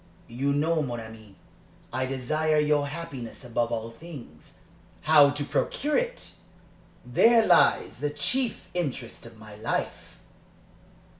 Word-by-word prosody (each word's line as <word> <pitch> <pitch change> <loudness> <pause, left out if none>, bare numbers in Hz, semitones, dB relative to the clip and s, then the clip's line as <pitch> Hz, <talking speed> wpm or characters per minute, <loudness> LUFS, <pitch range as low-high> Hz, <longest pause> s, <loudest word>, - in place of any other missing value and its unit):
You 130 +4 -1
know, 155 +3 +1
mon 120 -4 -3
ami, 110 -3 -11 0.6
I 130 +1 -1
desire 155 +4 0
your 150 -1 +2
happiness 140 -6 -7
above 120 0 -1
all 115 0 -3
things; 120 - -12 0.4
how 150 -2 +7
to 145 +1 -2
procure 295 - -1
it - - -1 0.7
there 230 -1 +5
lies 175 - +4
the 145 +1 -1
chief 230 - -1
interest 135 -10 -4
of 115 -1 -14
my 110 -1 -12
life." 110 - -3
140 Hz, 125 wpm, -27 LUFS, 115-160 Hz, 0.7 s, how